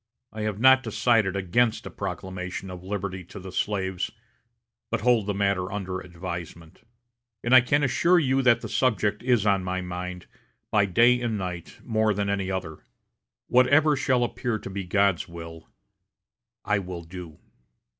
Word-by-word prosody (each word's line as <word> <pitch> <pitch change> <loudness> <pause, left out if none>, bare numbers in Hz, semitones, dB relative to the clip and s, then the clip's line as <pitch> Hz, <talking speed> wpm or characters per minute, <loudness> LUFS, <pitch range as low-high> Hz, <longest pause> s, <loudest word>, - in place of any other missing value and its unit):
I 110 - -5
have 105 -1 -2
not 130 +2 +7
decided 110 -4 +1
against 100 +5 +1
a - - -7
proclamation 95 0 -5
of 90 0 -9
liberty 95 -1 -4
to 95 - -10
the 95 0 -9
slaves, 95 -1 -2 0.8
but - - -1
hold 115 -3 +3
the 105 - 0
matter 100 -1 0
under 95 -2 -4
advisement. 85 -2 -8 0.6
And 120 - +1
I 130 - +10
can 145 +4 +1
assure 170 +7 +3
you 135 -4 +2
that 120 -2 +4
the - - -5
subject 105 -5 +1
is 120 -4 +2
on 100 -2 +2
my 95 0 -2
mind, 90 0 -6 0.5
by 105 -2 +4
day 120 +6 +4
and 115 -3 -1
night, 90 -3 -6
more 110 -2 +1
than 100 0 -1
any 95 -1 -1
other. 95 -5 -4 0.7
Whatever 145 +5 +4
shall 130 -2 +1
appear 120 -1 -2
to 95 - -8
be 95 -1 -4
God's 100 -1 +1
will, 85 -1 -10 1.0
I 105 -1 +2
will 90 -2 -7
do." 85 -2 -10
100 Hz, 160 wpm, -26 LUFS, 90-120 Hz, 1.0 s, I